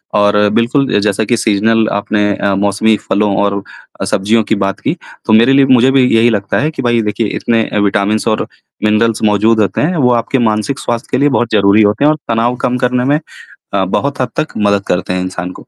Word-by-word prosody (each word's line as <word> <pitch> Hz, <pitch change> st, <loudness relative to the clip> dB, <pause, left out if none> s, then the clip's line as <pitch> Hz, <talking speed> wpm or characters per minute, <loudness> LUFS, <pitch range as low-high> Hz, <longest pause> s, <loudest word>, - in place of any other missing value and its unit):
और 105 Hz, 0 st, +2 dB, 0.2 s
बिल्कुल 130 Hz, +4 st, +1 dB
अ, -, -, +3 dB
जैसा 105 Hz, +1 st, 0 dB
कि 115 Hz, +3 st, 0 dB
सीज़नल 110 Hz, +1 st, +1 dB
आपने 105 Hz, 0 st, -1 dB
अ, 100 Hz, -1 st, -1 dB
मौसमी 100 Hz, +2 st, +1 dB
फलों 100 Hz, -1 st, +1 dB
और 100 Hz, 0 st, -1 dB, 0.4 s
अ, -, -, -1 dB
सब्जियों 110 Hz, +3 st, +1 dB
की 110 Hz, -, -1 dB
बात 100 Hz, -, -3 dB
की, -, -, -2 dB, 0.3 s
तो 110 Hz, -, +1 dB
मेरे 115 Hz, +5 st, +5 dB
लिए 135 Hz, 0 st, +4 dB
मुझे 130 Hz, 0 st, +4 dB
भी 135 Hz, -1 st, +3 dB
यही 115 Hz, +1 st, +4 dB
लगता 100 Hz, -3 st, -1 dB
है 155 Hz, +3 st, -1 dB
कि -, -, -6 dB
भाई 120 Hz, -2 st, +1 dB
देखिए 105 Hz, +1 st, -2 dB
इतने 115 Hz, -1 st, 0 dB
अ, -, -, -3 dB
विटामिन्स 105 Hz, +3 st, -1 dB
और 110 Hz, -, -1 dB, 0.4 s
मिनरल्स 110 Hz, +1 st, +1 dB
मौजूद 110 Hz, +2 st, +2 dB
होते 100 Hz, -, -1 dB
हैं 175 Hz, +4 st, 0 dB
वो 125 Hz, -4 st, +2 dB
आपके 120 Hz, +3 st, -1 dB
मानसिक 105 Hz, +5 st, -2 dB
स्वास्थ्य 120 Hz, -1 st, -3 dB
के -, -, +1 dB
लिए 145 Hz, +2 st, +2 dB
बहुत 120 Hz, -3 st, 0 dB
ज़रूरी 100 Hz, +1 st, +4 dB
होते 105 Hz, +5 st, +1 dB
हैं 150 Hz, -, +5 dB
और 155 Hz, -, -2 dB
तनाव 115 Hz, +2 st, 0 dB
कम 125 Hz, 0 st, 0 dB
करने 125 Hz, 0 st, 0 dB
में 145 Hz, +2 st, +1 dB, 0.5 s
अ, 95 Hz, -1 st, +1 dB
बहुत 140 Hz, +8 st, -2 dB
हद 125 Hz, -, -1 dB
तक 155 Hz, -, -3 dB
मदद 100 Hz, -1 st, +1 dB
करते 90 Hz, +1 st, -1 dB
हैं 90 Hz, -, -2 dB
इंसान 90 Hz, -1 st, -5 dB
को। -, -, -9 dB
110 Hz, 225 wpm, -13 LUFS, 100-125 Hz, 0.5 s, मेरे